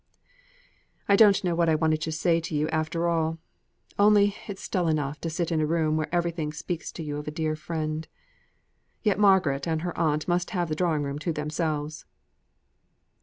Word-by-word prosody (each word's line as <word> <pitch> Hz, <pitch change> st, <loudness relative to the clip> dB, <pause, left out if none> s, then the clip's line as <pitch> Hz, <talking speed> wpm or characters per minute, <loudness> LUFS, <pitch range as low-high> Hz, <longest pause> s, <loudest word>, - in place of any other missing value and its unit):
"I 200 Hz, -, +5 dB
don't 200 Hz, -2 st, +6 dB
know 175 Hz, -2 st, +1 dB
what 170 Hz, 0 st, +2 dB
I 160 Hz, -, +4 dB
wanted 155 Hz, 0 st, +1 dB
to 160 Hz, -, -2 dB
say 165 Hz, +2 st, +2 dB
to 165 Hz, -1 st, -5 dB
you 150 Hz, +1 st, +1 dB
after 160 Hz, +2 st, -1 dB
all. 165 Hz, -1 st, 0 dB, 0.6 s
Only 205 Hz, -1 st, +5 dB
it's 200 Hz, -2 st, -6 dB
dull 180 Hz, -4 st, 0 dB
enough 150 Hz, -2 st, -1 dB
to 165 Hz, -, -2 dB
sit 170 Hz, +1 st, -2 dB
in 160 Hz, -1 st, +1 dB
a -, -, +2 dB
room 160 Hz, -1 st, +1 dB
where 155 Hz, -1 st, -1 dB
everything 170 Hz, -3 st, -1 dB
speaks 165 Hz, +2 st, -5 dB
to 165 Hz, -, -6 dB
you 145 Hz, -1 st, -4 dB
of 150 Hz, -, -7 dB
a -, -, 0 dB
dead 155 Hz, 0 st, -2 dB
friend. 155 Hz, -1 st, -3 dB, 1.0 s
Yet 210 Hz, -3 st, +2 dB
Margaret 185 Hz, -9 st, +3 dB
and 160 Hz, -1 st, -1 dB
her 175 Hz, -1 st, -3 dB
aunt 155 Hz, -2 st, 0 dB
must 175 Hz, 0 st, 0 dB
have 175 Hz, -2 st, 0 dB
the 155 Hz, -, -1 dB
drawing 160 Hz, -3 st, 0 dB
room 140 Hz, +1 st, -4 dB
to 165 Hz, +3 st, -2 dB
themselves!" 155 Hz, 0 st, -3 dB
160 Hz, 190 wpm, -26 LUFS, 155-175 Hz, 1.0 s, don't